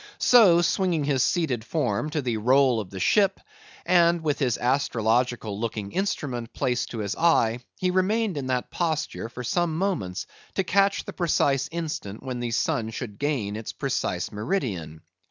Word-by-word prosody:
So, 190 -9 +6
swinging 170 -2 +1
his 140 -2 +1
seated 130 -7 0
form 150 +2 -1
to 150 -1 -2
the 120 -3 -1
roll 130 +2 +3
of 100 -4 -6
the 95 - -7
ship, 195 - +3 0.5
and 170 -1 +4
with 150 -2 -1
his 125 -5 +1
astrological 120 -4 0
looking 105 -3 -4
instrument 135 - -3
placed 125 -1 -1
to 115 - -6
his 105 -2 -2
eye, 125 -9 +3 0.2
he 185 -1 0
remained 195 +2 +1
in 140 -3 -3
that 125 -1 -2
posture 160 -8 -2
for 125 +1 -7
some 165 +5 0
moments 100 - -2 0.3
to 195 - +1
catch 195 +2 +2
the - - -7
precise 145 -6 +1
instant 150 -11 -5
when 130 -2 -4
the 120 -1 -2
sun 115 -1 0
should 110 -2 -7
gain 130 -9 -1
its 110 0 -6
precise - - -2
meridian. 105 - -3
135 Hz, 165 wpm, -25 LUFS, 115-170 Hz, 0.5 s, So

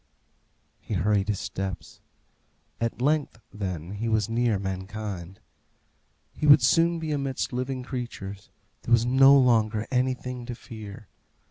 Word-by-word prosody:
He 105 - -5
hurried 100 +2 +1
his 105 -3 -1
steps. 95 -2 -6 0.8
At 115 +1 -2
length, 145 -4 +1
then, 95 -5 -5
he 110 +3 -3
was 110 -2 +1
near 115 -2 +1
mankind. 95 -1 -5 0.9
He 150 - -2
would 145 +1 +8
soon 170 0 +4
be 160 -1 -4
amidst 135 -3 -2
living 130 +1 -3
creatures. 115 -6 -6 0.3
There - - -7
was 120 0 +5
no 135 +3 +7
longer 110 -4 +3
anything 125 -1 -1
to 120 - -5
fear. 110 -2 -10
115 Hz, 130 wpm, -26 LUFS, 100-130 Hz, 0.9 s, would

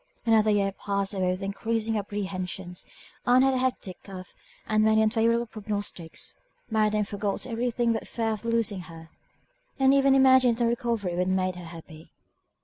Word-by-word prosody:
Another 220 -2 +4
year 200 -2 +2
passed 200 0 -2
away 185 -2 0
with 185 +2 -2
increasing 225 +3 -2
apprehensions. 190 -3 -4 0.4
Ann 250 +1 +6
had 270 0 +3
a 260 - 0
hectic 250 -8 -2
cough, 185 -2 -10 0.3
and 215 0 +2
many 220 0 +4
unfavourable 230 +1 +2
prognostics: 205 -6 -5 0.3
Mary 215 -1 +3
then 210 0 0
forgot 200 0 -3
every 245 0 -1
thing 235 0 +1
but 225 - -1
the - - -13
fear 225 -1 -2
of 215 0 -4
losing 230 -3 0
her, 165 -1 -11 0.7
and 270 0 +4
even 275 -1 +4
imagined 260 -3 +5
that 240 - 0
her 230 - +3
recovery 230 -5 -1
would - - -2
have 185 0 +2
made 185 -1 -1
her 180 -1 -9
happy. 165 -1 -12
215 Hz, 180 wpm, -27 LUFS, 190-230 Hz, 0.7 s, Ann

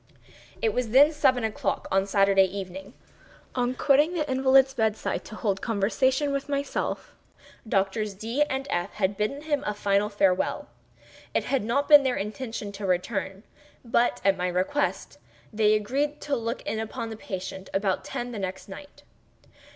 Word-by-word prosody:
It 445 - +2
was 250 -3 -1
then 280 +6 +6
seven 255 -5 +2
o'clock 220 -1 -2
on 195 +1 +2
Saturday 195 -1 +4
evening. 190 0 -7 0.6
On 250 0 0
quitting 295 +6 +3
the 305 -3 -1
invalid's 265 0 +4
bed 220 -4 +1
side - - -3
to 215 - -9
hold 200 -3 -1
conversation 260 +7 +1
with 275 +1 -3
myself, 280 0 -3 0.6
Doctors 195 +1 0
D—— 230 +8 -3
and 265 0 -2
F—— 175 +3 -2
had 200 -1 0
bidden 245 +9 -2
him 295 -2 -1
a 210 - -2
final 205 0 +1
farewell. 195 -3 +1 0.7
It - - +2
had 270 -5 0
not 260 +6 0
been 295 -2 +9
their 260 -2 0
intention 215 0 -5
to 200 0 -6
return; 190 +2 -2 0.4
but, 235 +1 +2
at 195 -1 +4
my 180 0 -1
request, 185 +12 -1 0.3
they 215 0 +4
agreed 280 +8 -1
to 285 - -1
look 230 0 -3
in 220 +2 -3
upon 225 +1 -5
the - - -5
patient 190 -2 -7
about 195 -1 0
ten 245 -2 -5
the 220 - -5
next 190 -1 -5
night. 285 +9 -11
220 Hz, 165 wpm, -26 LUFS, 195-265 Hz, 0.7 s, been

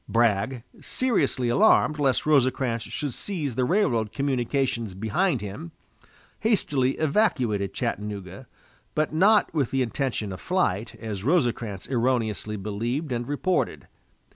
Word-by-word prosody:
Bragg, 115 +2 +1 0.2
seriously 160 - 0
alarmed 155 - +4
lest 135 -3 +2
Rosecrans 130 -5 +2
should 140 +4 -4
seize 155 - -3
the 125 +2 +1
railroad 125 - +1
communications 125 -5 -1
behind 125 - 0
him, 100 -5 -7 0.7
hastily 145 - +1
evacuated 130 - +1
Chattanooga, 100 +2 -4 0.5
but 155 0 0
not 205 +6 +4
with 145 -7 +1
the 135 -1 +1
intention 115 -3 -2
of 95 - -9
flight, 115 - 0
as 105 -4 -5
Rosecrans 120 - 0
erroneously 115 -4 0
believed 115 +9 -3
and 120 0 -2
reported. 175 +5 -1
125 Hz, 115 wpm, -25 LUFS, 110-150 Hz, 0.7 s, alarmed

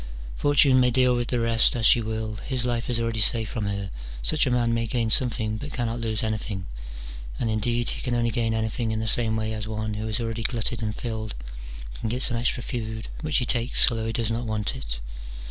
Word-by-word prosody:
Fortune 140 -2 +5
may 125 -1 +4
deal 125 0 +3
with 120 0 -1
the 125 - 0
rest 115 0 +4
as 115 -2 0
she 120 - +6
will, 110 -1 -3
his 125 +2 -2
life 120 -1 -1
is 120 -2 +1
already 115 -1 -1
safe 110 +1 +2
from 110 -3 -3
her: 100 -1 -3 0.3
such 155 -2 +3
a - - +2
man 120 -1 +2
may 115 0 0
gain 115 -1 0
something, 110 -3 +3
but 145 +5 -7
cannot 120 -1 -2
lose 110 -1 -1
anything: 105 -3 -3 0.7
and, 115 - 0
indeed, 120 +2 0
he - - -4
can 125 -2 -1
only 120 -1 +1
gain 115 0 0
anything 110 +1 -1
in 110 0 -1
the 110 - -2
same 110 0 +1
way 110 0 -1
as 110 0 -4
one 110 0 -3
who 105 +1 -3
is 110 +2 -1
already 115 -1 -3
glutted 115 0 -1
and 105 -1 -2
filled 110 -3 -4 0.6
can 110 - -2
get 125 +3 0
some 120 - +4
extra 120 +1 0
food 110 -3 -4
which 155 -2 +1
he 125 - +1
takes 120 +1 +2
although 115 -1 -2
he - - -1
does 115 -1 -1
not 115 +1 -2
want 110 +3 -1
it. - - -6
115 Hz, 230 wpm, -25 LUFS, 110-120 Hz, 0.7 s, she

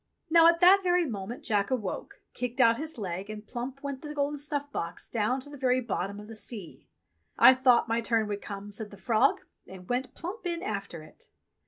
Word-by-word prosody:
Now, 335 0 +7
at 335 0 +4
that 380 +3 +7
very 355 -1 +3
moment 220 -2 -5
Jack 205 -3 +1
awoke, 220 -8 -4
kicked 250 +1 -4
out 230 -1 +5
his 315 -1 -5
leg, 190 -1 -4
and 215 0 -7
plump 255 +4 -6
went 280 -2 -4
the 300 -1 -7
golden 290 0 -1
snuff 285 0 -3
box 170 -8 -4
down 230 +3 0
to 285 - -12
the 285 - -10
very 255 -1 +2
bottom 200 -4 -3
of 210 - -10
the 225 - -9
sea! 215 -4 -7 0.5
"I 260 - +9
thought 255 -2 +4
my 230 +1 0
turn 225 -2 +1
would 205 -1 -4
come," 205 0 -7
said 210 +1 -5
the 200 - -13
frog, 220 +2 +2 0.3
and 185 -1 -11
went 250 +1 -2
plump 360 +3 -6
in 340 -1 -3
after 200 -6 -4
it. 155 - -16
240 Hz, 210 wpm, -28 LUFS, 205-285 Hz, 0.5 s, I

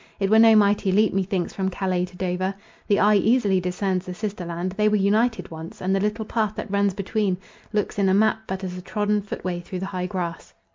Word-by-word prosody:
It 195 0 0
were 220 - +6
no 225 -1 +7
mighty 205 -2 +3
leap 210 +2 +3
methinks 190 -2 -1
from 190 -1 -1
Calais 185 -1 -1
to 180 0 -15
Dover. 185 +1 -1 0.3
The 205 - +3
eye 210 0 +5
easily 205 -2 +3
discerns 185 +1 -1
the 180 - -5
sister 205 -1 -4
land; 175 +2 -3
they 210 +2 +2
were 210 - +2
united 215 +3 +1
once; 160 +1 -9
and 190 +1 0
the - - +1
little 210 +2 -1
path 215 -1 -1
that 210 - -6
runs 200 -1 +1
between 200 -1 -1 0.3
looks 210 -1 -1
in 195 -1 +3
a - - +3
map 215 +1 +3
but 190 0 -4
as 180 -1 -4
a 180 - -7
trodden 210 +2 0
footway 185 -3 -4
through 180 +1 -6
high 185 -1 -3
grass. 175 -3 -5
195 Hz, 225 wpm, -24 LUFS, 185-210 Hz, 0.3 s, no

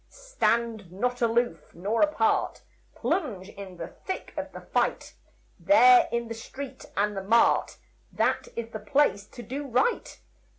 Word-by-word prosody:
Stand 235 - -1
not 245 +6 -2
aloof 235 -6 0
nor 205 +6 -1
apart, 300 -8 +1 0.3
Plunge 210 - -2
in 195 -3 -10
the 165 -1 -5 0.2
thick 380 - -5
of - - -5
the - - -9
fight. - - -1 0.5
There 250 -4 +6
in 235 0 -1
the 230 - -5
street 260 +4 -9
and 205 +1 +1
the 195 - -3
mart, 225 +5 +3 0.3
That - - 0
is 235 -1 -4
the 215 - -5
place 210 -2 +1
to 240 - -11
do 275 +6 -5
right. 275 - 0
235 Hz, 145 wpm, -27 LUFS, 205-265 Hz, 0.5 s, There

